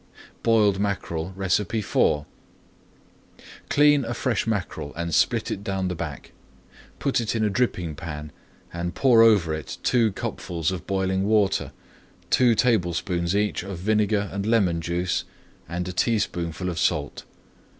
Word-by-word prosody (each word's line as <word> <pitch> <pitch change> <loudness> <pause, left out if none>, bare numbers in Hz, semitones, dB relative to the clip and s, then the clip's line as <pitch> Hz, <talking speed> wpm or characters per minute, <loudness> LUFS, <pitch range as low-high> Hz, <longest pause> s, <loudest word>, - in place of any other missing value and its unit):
BOILED 105 -4 +3
MACKEREL 95 -3 -2
IV 95 -5 +1 1.4
Clean 145 -1 +5
a 120 +1 -4
fresh 115 -3 -1
mackerel 90 -9 -3
and 85 0 -3
split - - +2
it 100 - -4
down 95 -2 -2
the 90 - -3
back. 80 -3 -6 0.7
Put 135 -3 0
it 115 0 -2
in 110 - +1
a 105 - +1
dripping 95 -8 -1
pan 75 -1 -7 0.4
and 85 0 -4
pour 125 -4 +5
over 100 -8 +5
it 80 -1 -5
two 115 -4 +3
cupfuls 85 -3 -3
of 90 -2 -6
boiling 95 0 0
water, 105 -2 +2 0.6
two 120 -3 +4
tablespoonfuls 90 -5 +1
each 105 0 0
of 95 0 -6
vinegar 105 +2 +1
and 100 +1 -3
lemon 95 -8 +2
juice, 85 +2 -1 0.5
and 85 +1 -3
a 90 - -4
teaspoonful 90 -5 -1
of 85 -2 -3
salt. 75 -4 -1
95 Hz, 140 wpm, -24 LUFS, 85-110 Hz, 1.4 s, Clean